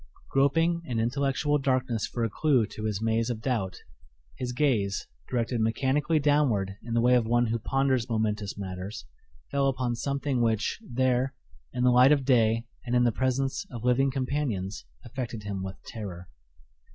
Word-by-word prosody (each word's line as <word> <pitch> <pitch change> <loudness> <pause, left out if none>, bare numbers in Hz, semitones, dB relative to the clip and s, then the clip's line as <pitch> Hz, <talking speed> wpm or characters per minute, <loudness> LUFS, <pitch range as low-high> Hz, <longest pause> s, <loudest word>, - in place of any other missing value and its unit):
Groping 165 +5 +2
in 120 -7 -2
intellectual 140 +5 +1
darkness 130 -4 0
for 120 - -3
a 115 - +1
clew 135 -2 +2
to 110 0 -7
his 105 0 -2
maze 115 +1 +1
of 120 -3 -2
doubt, 110 -7 -2 0.6
his 125 - -3
gaze, 120 -8 0 0.2
directed 120 -1 0
mechanically 135 +8 +1
downward 140 -10 +2
in 115 -1 -4
the 115 - +3
way 125 +1 +4
of 120 -3 +3
one 120 +1 +3
who 115 0 -1
ponders 130 0 +1
momentous 105 -3 -1
matters, 95 -5 -6 0.5
fell 140 -1 +2
upon 130 -2 0
something 140 0 -1
which, 115 - 0
there, 130 - 0 0.4
in 125 - -2
the 125 - +5
light 125 +3 +6
of 140 -3 +3
day 115 -3 +3 0.2
and 120 0 -1
in 125 - +4
the 120 - +3
presence 130 +2 0
of 120 -3 -7
living 130 +2 +3
companions, 130 - -2 0.2
affected 120 -3 -5
him 100 -2 -4
with 95 0 -5
terror. 95 -5 -7
120 Hz, 165 wpm, -28 LUFS, 110-135 Hz, 0.6 s, light